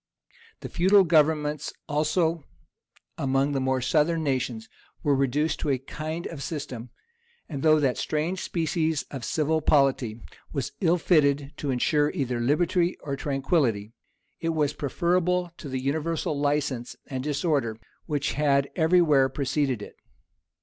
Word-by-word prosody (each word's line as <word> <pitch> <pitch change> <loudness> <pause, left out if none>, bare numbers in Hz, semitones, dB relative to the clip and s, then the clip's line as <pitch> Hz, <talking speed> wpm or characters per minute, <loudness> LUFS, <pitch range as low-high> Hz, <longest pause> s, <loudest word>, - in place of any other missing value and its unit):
The - - -6
feudal 190 +3 +5
governments 150 -2 +2 0.2
also, 160 +2 +1 0.8
among 135 +1 +1
the 140 - 0
more 130 0 0
southern 160 +4 +2
nations, 125 -5 -2 0.4
were 145 - +3
reduced 140 +3 0
to 150 - -2
a 135 - +2
kind 155 +5 -6
of 155 -4 -6
system; 135 -7 -5 0.6
and 140 -5 -5
though 155 0 +5
that 135 -4 +1
strange 165 +5 -1
species 160 -2 -1
of 135 -4 -6
civil 155 +3 0
polity 135 -7 +2 0.3
was 140 -4 -3
ill 175 -1 +3
fitted 145 -4 +2
to 145 - -4
insure 145 +3 +2
either 125 -3 -1
liberty 170 +7 +1
or 140 -1 -3
tranquillity, 135 - 0 0.5
it 165 -1 -1
was 150 -2 +1
preferable 180 +3 0
to 145 - -8
the 130 0 -2
universal 155 +3 -1
license 145 -4 -1
and 130 -1 -5
disorder 145 -6 0 0.3
which 145 -3 -1
had 140 -2 +2
every 175 +2 +4
where 140 -4 +4
preceded 135 -3 -1
it. - - -11
150 Hz, 140 wpm, -26 LUFS, 135-160 Hz, 0.8 s, feudal